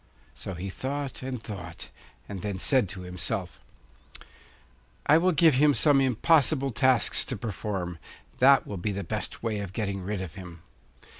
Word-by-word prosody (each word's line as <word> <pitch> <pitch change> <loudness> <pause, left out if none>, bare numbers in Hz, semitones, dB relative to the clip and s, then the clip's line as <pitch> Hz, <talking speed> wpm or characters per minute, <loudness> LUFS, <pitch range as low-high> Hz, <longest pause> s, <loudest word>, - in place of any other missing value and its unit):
So 95 - -7
he 95 +3 -5
thought 140 +4 -4
and 130 -1 -4
thought, 90 -6 -8 0.4
and 100 -3 -6
then 100 -2 -3
said 125 0 +2
to 95 0 -7
himself: 90 -2 -3 1.5
'I 150 +3 +6
will 185 +2 +3
give 160 -1 +5
him 145 +2 +4
some 145 -3 +4
impossible 135 +2 +3
tasks 125 +2 +3
to - - -4
perform; 95 -6 -4 0.4
that 135 +1 +6
will 100 - -6
be 100 +4 -2
the 100 0 -3
best 85 - -5
way 110 -3 -1
of 100 -2 -6
getting 100 -3 -3
rid 95 +1 -3
of 85 -4 -8
him. 90 -4 -11
105 Hz, 160 wpm, -27 LUFS, 95-135 Hz, 1.5 s, I